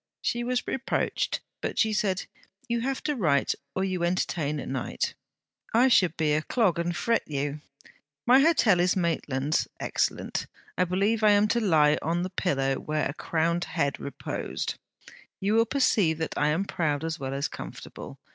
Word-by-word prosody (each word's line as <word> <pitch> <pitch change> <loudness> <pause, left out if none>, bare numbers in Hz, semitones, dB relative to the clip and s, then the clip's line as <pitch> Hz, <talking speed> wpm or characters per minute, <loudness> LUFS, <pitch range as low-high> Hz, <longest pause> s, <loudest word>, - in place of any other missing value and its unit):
She 240 0 0
was 250 0 -1
reproached, 265 - -1 0.2
but - - -3
she 220 -1 +3
said: 195 -3 0 0.4
'You 235 -1 0
have 265 +2 -2
to 300 -1 0
write 155 - +2 0.2
or 190 - 0
you 185 -2 -1
entertain 170 -4 0
at - - -6
night; 130 -2 -2 0.6
I 250 +3 +6
should 180 -9 +4
be 155 -2 +2
a 155 - +2
clog 195 -1 +1
and 170 0 -1
fret 230 0 +2
you. 145 0 -3 0.6
My 250 +2 +7
hotel 275 - +4
is 180 +1 +3
Maitland's; 155 -5 0
excellent; - - -1 0.3
I 180 - +2
believe 200 +5 +1
I 215 - +7
am 205 +1 +4
to 235 - +2
lie 155 -8 +4
on 170 +3 0
the 185 - -4
pillow 135 -8 0
where 155 0 -1
a 135 - -5
crowned 170 +2 0
head 140 -4 -1
reposed! 140 - -4 0.7
You 200 +2 0
will 230 +1 +4
perceive 210 - +2
that 160 0 -3
I 150 - +2
am 160 +6 +1
proud 155 -6 -1
as 165 0 -3
well 135 0 -3
as 140 +1 -1
comfortable. - - -9
175 Hz, 175 wpm, -27 LUFS, 150-215 Hz, 0.7 s, My